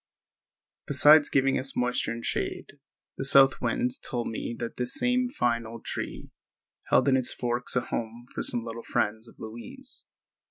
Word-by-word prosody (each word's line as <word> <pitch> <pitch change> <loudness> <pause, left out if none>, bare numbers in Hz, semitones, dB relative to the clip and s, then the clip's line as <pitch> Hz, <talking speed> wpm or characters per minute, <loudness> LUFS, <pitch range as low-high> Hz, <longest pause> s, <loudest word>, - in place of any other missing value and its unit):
Besides 150 0 +6
giving 135 0 +2
us 135 +1 -2
moisture 125 -1 0
and 115 0 -5
shade, 145 - -3 0.4
the - - -3
south 135 0 +5
wind 250 +2 -1
told 120 -2 -3
me 115 +1 -4
that 115 -1 -5
this 125 0 -2
same 250 0 +1
fine 120 - 0
old 115 0 -10
tree - - -5 0.6
held 130 - +4
in 135 - +5
its 130 -1 +3
forks 120 0 -2
a 125 - +3
home 120 0 -5
for - - -3
some 120 -1 -1
little 115 0 -6
friends 110 +1 -1
of - - -16
Louise. 255 - -8
125 Hz, 165 wpm, -27 LUFS, 115-140 Hz, 0.6 s, Besides